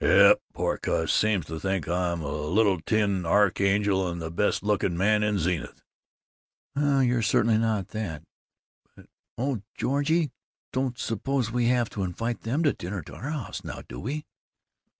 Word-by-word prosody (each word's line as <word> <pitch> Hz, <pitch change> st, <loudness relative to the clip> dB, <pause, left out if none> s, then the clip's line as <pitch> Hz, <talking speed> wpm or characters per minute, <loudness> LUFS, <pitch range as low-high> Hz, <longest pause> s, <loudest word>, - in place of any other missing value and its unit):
"Yep. -, -, +7 dB
Poor -, -, -1 dB
cuss! -, -, 0 dB
Seems 105 Hz, -6 st, +2 dB
to 80 Hz, +1 st, -6 dB
think 95 Hz, -4 st, -1 dB
I'm 85 Hz, -1 st, -1 dB
a 70 Hz, -, -3 dB
little 95 Hz, +4 st, +2 dB
tin 100 Hz, -3 st, +1 dB
archangel, 100 Hz, +1 st, +2 dB
and 85 Hz, 0 st, -4 dB
the 80 Hz, -1 st, -5 dB
best 100 Hz, +4 st, 0 dB
looking 100 Hz, -4 st, +1 dB
man 105 Hz, +3 st, +3 dB
in 105 Hz, -1 st, +1 dB
Zenith." 85 Hz, -1 st, -2 dB, 0.9 s
"Well, 140 Hz, -1 st, +3 dB
you're 125 Hz, -1 st, +2 dB
certainly 110 Hz, +1 st, +3 dB
not 110 Hz, -4 st, 0 dB
that 90 Hz, -9 st, -5 dB, 0.7 s
but -, -, -16 dB, 0.3 s
Oh, 125 Hz, -2 st, -1 dB
Georgie, 145 Hz, +4 st, +1 dB
you 165 Hz, -4 st, +1 dB, 0.4 s
don't 130 Hz, -2 st, -1 dB
suppose 120 Hz, +1 st, -1 dB
we 120 Hz, 0 st, +1 dB
have 120 Hz, -2 st, +2 dB
to 100 Hz, -, -4 dB
invite 115 Hz, +6 st, -3 dB
them 135 Hz, +9 st, -1 dB
to 145 Hz, -, +3 dB
dinner 95 Hz, +4 st, -5 dB
at -, -, -12 dB
our 135 Hz, -, -6 dB
house 150 Hz, -7 st, -5 dB
now, -, -, -7 dB
do -, -, -8 dB
we?" 145 Hz, -, -4 dB
105 Hz, 170 wpm, -27 LUFS, 90-120 Hz, 0.9 s, Yep